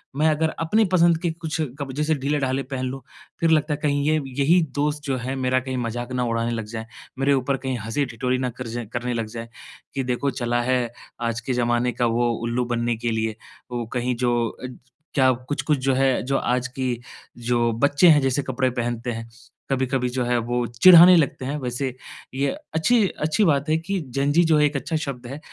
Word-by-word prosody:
मैं 155 +2 +2
अगर 160 +1 +1
अपनी 210 +7 +2
पसंद 170 -2 +5
के 175 - 0
कुछ 160 -1 -5 0.2
क 140 - -3
जैसे 150 +2 0
ढीले-ढाले 135 -1 -1
पहन 130 -1 -4
लूँ 135 0 -6 0.4
फिर 165 - +2
लगता 155 -1 +2
है - - -4
कहीं 145 -1 +1
ये 155 0 +3 0.2
यही 170 +5 +5
दोस्त 150 +1 0
जो 135 -2 -1
हैं 130 +3 -4
मेरा 130 0 +1
कहीं 130 0 -4
मज़ाक 120 +1 -4
ना 125 -1 0
उड़ाने 115 0 -1
लग 110 -2 -3
जाएँ, 110 +1 -6 0.3
मेरे 140 +1 +3
ऊपर 135 +1 0
कहीं 130 -2 -3
हँसी-ठिठोली 125 +2 -1
ना 130 -1 -1
कर 125 0 -7
जाए 120 0 -4
करने 120 +1 -2
लग 115 -2 -2
जाएँ 115 0 -6 0.5
कि 135 - -1
देखो 125 +3 -1
चला 120 0 0
है 125 -1 0 0.3
आज 115 0 -1
के 125 +2 -2
ज़माने 120 0 +1
का 120 - 0
वो 120 +1 +1
उल्लू 120 +1 -1
बनने 120 -1 -1
के 120 0 -2
लिए, 110 -1 -1 0.4
वो 120 -1 -3
कहीं 125 0 -1
जो 120 0 +1
अ 130 - -8
ज 125 - -11 0.4
क्या 130 -2 +4 0.2
कुछ-कुछ 145 0 0
जो 130 +1 +1
है 135 0 +2
जो 135 +1 0
आज 125 +1 0
की, 130 -3 -3 0.4
जो 120 -1 +1
बच्चे 145 +6 +4
हैं 150 -2 +6
जैसे 135 +1 0
कपड़े 130 0 0
पहनते 120 0 -3
हैं। 115 0 -6 0.4
कभी-कभी 130 -1 0
जो 125 0 -1
है 120 0 +1
वो 120 +1 -1
चिढ़ाने 175 +8 +8
लगते 135 -4 0
हैं, 140 +3 -2
वैसे 130 0 -3 0.4
ये 140 +1 +1 0.3
अच्छी-अच्छी 185 -1 +2
बात 145 -2 +2
है 160 - +3
कि 190 +4 -3 0.2
जेन 140 +1 +1
ज़ी 170 +2 +5
जो 160 -1 +4
है 150 - +4
एक 145 0 -1
अच्छा 160 +4 -2
शब्द 135 -5 -4
है 140 +4 -7
130 Hz, 210 wpm, -23 LUFS, 120-145 Hz, 0.5 s, चिढ़ाने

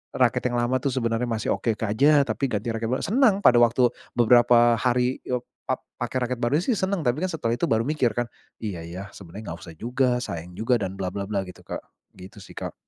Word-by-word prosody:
raket - - +2
yang - - +1
lama 125 +2 +1
tuh, 135 0 -2
sebenarnya 115 -2 0
masih 110 -2 -2
oke, 115 - 0
Kak, 105 -1 -2
ja 145 +2 +6
tapi 140 0 -1
ganti 105 +3 -1
raket 115 0 -3
baru 130 - -1
senang, 215 - +3
pada 120 - +7
waktu 120 +1 +4 0.3
beberapa 120 0 +5
hari, 125 +1 +1
eee, 125 -1 -1 0.2
pap 130 - -2 0.2
pakai 120 +1 -3
raket 125 - -2
baru 145 +8 +2
sih, 230 0 0
senang. 190 -2 0
Tapi 135 +6 0
kan, 185 - -2
setelah 120 -7 -1
itu - - +1
baru 110 0 +2
mikir 145 -6 +1
kan, 120 -1 -2 0.3
"Iya 90 -7 -5
ya, 90 +3 -7
sebenarnya 100 +2 -10
nggak 85 - -10
usah 80 - -10
juga, 125 +2 0
sayang 85 -4 -6
juga, 120 +5 +1
dan, 95 -3 -3
bla-bla-bla," 100 +1 -2
gitu, 90 - -12
Kak, - - -5 0.3
gitu 95 +3 -13
sih, - - -13
Kak. - - -6
120 Hz, 220 wpm, -25 LUFS, 105-130 Hz, 0.3 s, pada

